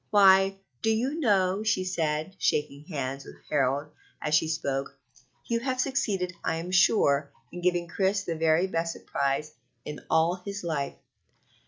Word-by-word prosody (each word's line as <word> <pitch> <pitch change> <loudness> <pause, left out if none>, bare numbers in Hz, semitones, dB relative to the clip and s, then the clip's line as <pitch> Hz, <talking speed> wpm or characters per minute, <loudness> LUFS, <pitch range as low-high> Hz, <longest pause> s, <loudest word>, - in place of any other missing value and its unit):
"Why, 195 -1 +6 0.2
do 225 - +1
you 255 +8 0
know," 195 - +2
she 215 -4 +1
said, 160 -1 -1
shaking 145 -1 0
hands 140 -5 -4
with - - -12 0.2
Harold 140 0 +1 0.3
as 150 - -2
she 155 +1 +4
spoke, 140 -3 -2 0.5
"you 230 -1 0
have 255 +1 -2
succeeded, 220 -10 0
I - - 0
am 170 +3 -5
sure, 145 -6 +3 0.2
in 175 - -7
giving 175 -1 +1
Chris 195 +3 0
the 170 - -2
very 160 +2 +3
best 165 -3 -1
surprise 140 +2 -2 0.3
in 150 - -6
all 165 +3 +2
his 200 0 -5
life." 150 -5 -2
175 Hz, 155 wpm, -27 LUFS, 150-195 Hz, 0.5 s, Why